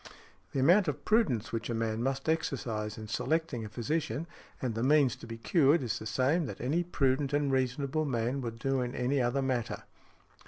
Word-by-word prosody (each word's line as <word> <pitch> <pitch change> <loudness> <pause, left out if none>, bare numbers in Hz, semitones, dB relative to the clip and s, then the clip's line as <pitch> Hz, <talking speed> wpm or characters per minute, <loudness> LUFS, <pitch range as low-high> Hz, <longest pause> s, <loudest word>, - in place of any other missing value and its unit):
The 135 - -1
amount 180 +8 +5
of 145 -1 -3
prudence 205 - +2
which 115 +1 -3
a 120 - -1
man 115 0 -1
must 135 +3 -2
exercise 115 -9 -1
in 110 -1 -7
selecting 155 +1 -1
a 110 - -6
physician, 150 +8 -2 0.3
and 125 -3 -2
the 110 - -3
means 140 -1 +4
to - - -11
be 115 0 -6
cured, 145 +4 +3
is 115 -1 -2
the 110 - -6
same 135 - +1
that - - -7
any 145 +8 +1
prudent 140 -4 0
and 145 -1 +1
reasonable 135 +4 0
man 125 0 -1
would 115 -2 -5
do 135 +1 0
in 125 0 -3
any 130 +2 +1
other 125 +3 +1
matter. 125 -3 -2
130 Hz, 195 wpm, -31 LUFS, 115-145 Hz, 0.3 s, amount